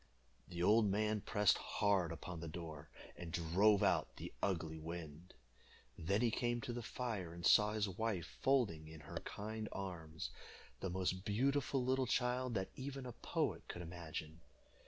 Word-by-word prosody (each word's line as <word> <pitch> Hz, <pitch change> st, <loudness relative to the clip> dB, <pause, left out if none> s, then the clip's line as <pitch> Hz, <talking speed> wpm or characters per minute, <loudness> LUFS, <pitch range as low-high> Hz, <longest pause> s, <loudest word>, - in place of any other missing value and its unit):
The 85 Hz, -1 st, -3 dB
old 105 Hz, +2 st, +6 dB
man 105 Hz, +1 st, +1 dB
pressed 105 Hz, -1 st, +3 dB
hard 95 Hz, -5 st, +2 dB
upon 85 Hz, +1 st, -6 dB
the 85 Hz, -, -5 dB
door, 80 Hz, -2 st, -7 dB, 0.3 s
and 85 Hz, -2 st, -7 dB
drove 95 Hz, +5 st, +4 dB
out 95 Hz, -, +2 dB
the -, -, -7 dB
ugly 80 Hz, -4 st, -1 dB
wind. 80 Hz, +1 st, -7 dB, 0.6 s
Then 100 Hz, +6 st, +1 dB
he 120 Hz, -2 st, +3 dB
came 120 Hz, +1 st, +1 dB
to 120 Hz, -, -3 dB
the 120 Hz, -, -3 dB
fire, 110 Hz, -8 st, -3 dB
and 85 Hz, -, -5 dB
saw 105 Hz, 0 st, +6 dB
his 105 Hz, -1 st, +1 dB
wife 95 Hz, -2 st, -1 dB, 0.2 s
folding 110 Hz, -13 st, +2 dB
in 80 Hz, -1 st, -10 dB
her -, -, -6 dB
kind 110 Hz, +1 st, -4 dB
arms 80 Hz, -5 st, -5 dB, 0.5 s
the 95 Hz, -, -2 dB
most 95 Hz, 0 st, 0 dB
beautiful 135 Hz, +4 st, +1 dB
little 130 Hz, 0 st, +2 dB
child 125 Hz, 0 st, +1 dB
that 95 Hz, -1 st, -1 dB
even 135 Hz, 0 st, -5 dB
a 125 Hz, -, -4 dB
poet -, -, -1 dB
could 90 Hz, -, -5 dB
imagine. 80 Hz, -1 st, -6 dB
95 Hz, 160 wpm, -39 LUFS, 85-115 Hz, 0.6 s, old